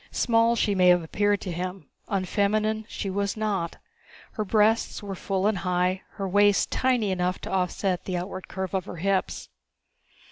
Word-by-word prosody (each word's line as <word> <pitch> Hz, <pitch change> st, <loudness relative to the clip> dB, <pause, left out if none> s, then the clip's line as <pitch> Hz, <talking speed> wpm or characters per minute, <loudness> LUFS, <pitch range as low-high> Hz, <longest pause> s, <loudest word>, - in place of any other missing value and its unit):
Small 230 Hz, 0 st, +3 dB
she 210 Hz, -2 st, +1 dB
may 185 Hz, -2 st, +4 dB
have 180 Hz, -1 st, +5 dB
appeared 205 Hz, +5 st, +1 dB
to 185 Hz, -, -4 dB
him: 180 Hz, +2 st, -5 dB, 0.2 s
unfeminine 215 Hz, +3 st, 0 dB
she -, -, -4 dB
was 200 Hz, +2 st, -1 dB
not. 200 Hz, -6 st, -2 dB, 0.5 s
Her 215 Hz, -, -3 dB
breasts 215 Hz, +2 st, +2 dB
were 200 Hz, -1 st, -5 dB
full 190 Hz, +1 st, -2 dB
and 210 Hz, -3 st, +2 dB
high, 180 Hz, +1 st, 0 dB
her 195 Hz, -2 st, -4 dB
waist 205 Hz, +1 st, +3 dB
tiny 245 Hz, -6 st, +1 dB
enough 180 Hz, 0 st, 0 dB
to -, -, -6 dB
offset 185 Hz, 0 st, -1 dB
the 185 Hz, -2 st, -2 dB
outward 185 Hz, +1 st, -6 dB
curve 190 Hz, -1 st, -5 dB
of 190 Hz, -2 st, -1 dB
her -, -, -7 dB
hips. 195 Hz, +2 st, -1 dB
195 Hz, 170 wpm, -26 LUFS, 185-210 Hz, 0.5 s, have